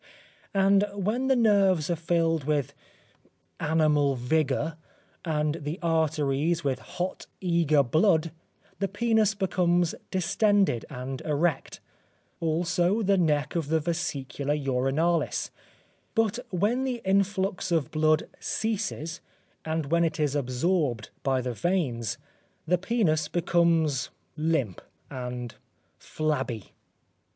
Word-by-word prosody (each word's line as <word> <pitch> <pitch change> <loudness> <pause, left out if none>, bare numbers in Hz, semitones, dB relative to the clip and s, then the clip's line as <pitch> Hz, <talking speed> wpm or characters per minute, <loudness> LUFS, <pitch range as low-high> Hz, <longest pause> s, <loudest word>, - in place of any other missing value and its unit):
And 195 +1 +4
when 215 +7 -1
the 265 - +4
nerves 195 -8 +3
are - - +2
filled 165 -2 0
with 145 -4 0 0.9
animal 150 -3 +2
vigour 150 +4 0 0.5
and 150 -1 0
the 150 +4 -4
arteries 160 0 +1
with 135 -3 0
hot, 180 +7 -5
eager 170 -5 +3
blood, 160 - +2 0.5
the 195 - +1
penis 220 0 +2
becomes 175 -3 +1 0.2
distended 190 - +2
and 130 -1 -6
erect; 155 +2 -1 0.6
also 175 +5 +1
the 200 0 +3
neck 150 -4 +1
of 165 -4 -1
the 160 +1 +2
vesicula 145 -3 -2
urinalis, 140 +4 0 0.6
but 225 0 +1
when 210 +8 +1
the 250 -3 -3
influx 195 -1 +1
of 160 -6 +1
blood 155 0 +2
ceases, 190 -7 -3 0.4
and 160 -2 -2
when 170 0 +4
it 160 -1 -1
is 150 -2 +1
absorbed 130 - 0
by 135 -1 +1
the 125 0 -3
veins, 120 - -1 0.5
the 175 +2 +2
penis 175 -8 +1
becomes 165 -5 +1 0.3
limp 150 - -1 0.3
and 125 -2 -5 0.5
flabby. 135 -9 -3
160 Hz, 110 wpm, -27 LUFS, 145-185 Hz, 0.9 s, And